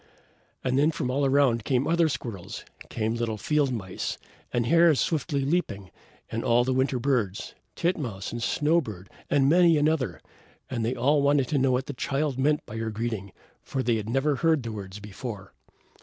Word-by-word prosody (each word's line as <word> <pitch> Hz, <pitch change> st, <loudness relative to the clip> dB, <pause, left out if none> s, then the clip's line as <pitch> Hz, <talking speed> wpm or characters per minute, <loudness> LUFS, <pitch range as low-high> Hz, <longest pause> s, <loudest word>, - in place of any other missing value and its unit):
And 130 Hz, +1 st, +1 dB
then 150 Hz, +2 st, +4 dB
from 145 Hz, -5 st, -2 dB
all 140 Hz, +1 st, +1 dB
around 135 Hz, -5 st, +3 dB
came 130 Hz, +2 st, +1 dB
other 170 Hz, -1 st, +3 dB
squirrels, 115 Hz, -10 st, -6 dB, 0.2 s
came 110 Hz, -1 st, -1 dB
little 115 Hz, -2 st, -2 dB
field 145 Hz, +3 st, +1 dB
mice, 95 Hz, -6 st, -4 dB, 0.3 s
and 120 Hz, -1 st, 0 dB
hares 165 Hz, +1 st, +5 dB
swiftly 145 Hz, -3 st, 0 dB
leaping, 115 Hz, -, -1 dB, 0.4 s
and 115 Hz, -, -2 dB
all 120 Hz, +1 st, +4 dB
the 130 Hz, +1 st, 0 dB
winter 130 Hz, 0 st, +1 dB
birds, 115 Hz, -6 st, -1 dB, 0.2 s
titmouse 130 Hz, -, -2 dB
and 120 Hz, -, -5 dB
snow 155 Hz, +7 st, +2 dB
bird, 100 Hz, -, -9 dB, 0.2 s
and 140 Hz, -1 st, +3 dB
many 170 Hz, +1 st, +5 dB
another; 150 Hz, -3 st, +1 dB, 0.5 s
and 120 Hz, -3 st, -1 dB
they 120 Hz, +3 st, 0 dB
all 140 Hz, +4 st, +3 dB
wanted 140 Hz, -2 st, +3 dB
to 145 Hz, -, +1 dB
know 130 Hz, 0 st, +3 dB
what 125 Hz, +1 st, 0 dB
the 145 Hz, -, -5 dB
Child 140 Hz, +1 st, -1 dB
meant 150 Hz, +2 st, +2 dB
by 110 Hz, -, -7 dB
her 115 Hz, 0 st, -2 dB
greeting, 110 Hz, -3 st, -4 dB, 0.3 s
for 130 Hz, -, -3 dB
they 120 Hz, -2 st, +2 dB
had 110 Hz, 0 st, -5 dB
never 135 Hz, +3 st, +1 dB
heard 160 Hz, -4 st, +2 dB
the 115 Hz, -, -4 dB
words 100 Hz, -2 st, -7 dB
before. 105 Hz, -1 st, -8 dB
130 Hz, 185 wpm, -27 LUFS, 115-145 Hz, 0.5 s, hares